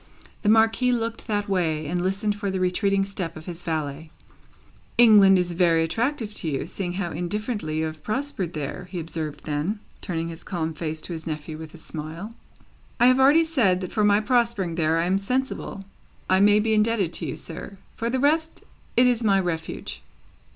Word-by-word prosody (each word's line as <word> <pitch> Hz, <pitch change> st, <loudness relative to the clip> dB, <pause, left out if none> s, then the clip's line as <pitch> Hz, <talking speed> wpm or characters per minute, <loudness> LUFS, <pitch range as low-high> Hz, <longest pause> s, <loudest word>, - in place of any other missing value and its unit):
The 205 Hz, -, +1 dB
Marquis 225 Hz, +3 st, +4 dB
looked 230 Hz, -1 st, -2 dB
that 205 Hz, -2 st, -1 dB
way, 165 Hz, -5 st, 0 dB
and 175 Hz, +4 st, -1 dB
listened 200 Hz, +3 st, 0 dB
for 205 Hz, -1 st, -3 dB
the 190 Hz, 0 st, -2 dB
retreating 195 Hz, +2 st, +1 dB
step 185 Hz, -5 st, -5 dB
of 155 Hz, -, -10 dB
his 175 Hz, -1 st, -7 dB
valet. 155 Hz, -2 st, -3 dB, 0.9 s
"England 210 Hz, -5 st, +7 dB
is 180 Hz, -1 st, 0 dB
very 165 Hz, -2 st, +3 dB
attractive 225 Hz, -, -1 dB
to 165 Hz, -, -2 dB
you, 135 Hz, -3 st, -2 dB
seeing 180 Hz, -3 st, -4 dB
how 180 Hz, -2 st, -3 dB
indifferently 180 Hz, 0 st, -3 dB
you 160 Hz, -, 0 dB
have 155 Hz, -1 st, -6 dB
prospered 215 Hz, -, -3 dB
there," 150 Hz, +3 st, -5 dB
he 180 Hz, -, -4 dB
observed 160 Hz, -2 st, -5 dB
then, 155 Hz, +8 st, -2 dB, 0.2 s
turning 165 Hz, -2 st, -3 dB
his 165 Hz, +1 st, -8 dB
calm 165 Hz, -3 st, -3 dB
face 155 Hz, 0 st, -4 dB
to 175 Hz, -, -4 dB
his 160 Hz, 0 st, -7 dB
nephew 155 Hz, 0 st, -4 dB
with 160 Hz, +1 st, -9 dB
a -, -, -10 dB
smile. 160 Hz, +7 st, -7 dB, 0.7 s
"I 240 Hz, -, +6 dB
have 255 Hz, +1 st, +6 dB
already 285 Hz, +5 st, +6 dB
said, 245 Hz, -, +2 dB
that 185 Hz, -, -5 dB
for 215 Hz, -, +1 dB
my 205 Hz, 0 st, +5 dB
prospering 215 Hz, -6 st, +1 dB
there, 165 Hz, -1 st, +1 dB
I 165 Hz, -, +1 dB
am 190 Hz, +2 st, +2 dB
sensible 250 Hz, -3 st, -3 dB, 0.4 s
I 185 Hz, 0 st, +4 dB
may 205 Hz, +1 st, +6 dB
be 220 Hz, +1 st, +1 dB
indebted 210 Hz, -5 st, +2 dB
to -, -, -2 dB
you, -, -, -3 dB
sir. 180 Hz, +4 st, -8 dB, 0.2 s
For 230 Hz, -, -2 dB
the 260 Hz, -, 0 dB
rest, 315 Hz, +4 st, +1 dB, 0.3 s
it 245 Hz, -, +7 dB
is 245 Hz, -2 st, +2 dB
my 200 Hz, -3 st, +4 dB
Refuge." 165 Hz, -3 st, -4 dB
190 Hz, 195 wpm, -25 LUFS, 165-220 Hz, 0.9 s, England